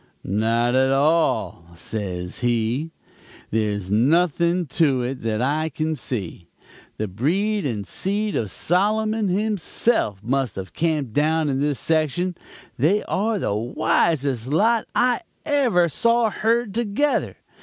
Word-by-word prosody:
"'Not 115 +4 +1
at 130 +1 +3
all,' 145 - +1
says 90 -1 -5
he. 120 +5 0 0.6
'There's 105 -3 -1
nothing 170 - +2
to 140 -3 +1
it 130 +1 -4
that 110 +1 -1
I 155 +4 0
can 155 0 -2
see. 100 - -5 0.5
The 110 - -2
breed 180 - 0
and 105 -5 -3
seed 205 - -2
of 110 - -1
Solomon 215 - +1
himself 195 - 0
must 130 -1 -1
have 95 -3 -7
camped 150 -7 -1
down 155 +2 +1
in 135 -1 0
this 145 -1 0
section; 165 +3 0 0.4
they 185 - +3
are 215 +2 -1
the 140 - -1
wisest 130 +3 0
lot 215 - +2
I 250 +4 +2 0.2
ever 250 - +3
saw 230 - +2
herd 225 -1 0
together. 235 +6 0
150 Hz, 125 wpm, -22 LUFS, -, 0.6 s, at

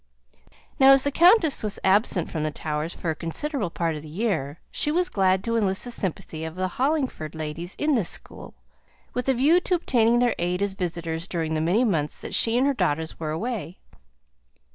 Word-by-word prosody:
Now, 270 0 +8
as 270 -1 +4
the 285 - +1
countess 340 0 +5
was 210 -2 -3
absent 190 -3 +2
from 160 - -3
the 155 - 0
Towers 150 +1 -3
for 170 - -3
a - - -4
considerable 205 - -3
part 165 -1 -2
of 150 - -6
the 155 - -11
year, 160 -5 -2
she 295 - 0
was 355 +3 +1
glad 190 - +2
to 230 +1 -1
enlist 195 -4 0
the 245 - -5
sympathy 165 -6 -4
of 160 +1 -6
the 185 0 -1
Hollingford 260 - -1
ladies 160 +3 -5
in 300 0 +1
this 220 -10 +2
school, - - -6 0.6
with 250 +2 -2
a 265 - +3
view 295 +8 +4
to 360 0 0
obtaining 240 -8 +2
their 245 -1 +3
aid 180 +2 0
as 200 -1 -1
visitors 170 -2 -3
during 165 -3 -2
the 155 - 0
many 180 +9 +2
months 160 -10 0
that - - -8
she 230 +1 +3
and 260 - +3
her 280 - +2
daughters 160 - -2
were 160 -2 -3
away. 195 +1 -4
190 Hz, 205 wpm, -25 LUFS, 160-250 Hz, 0.6 s, Now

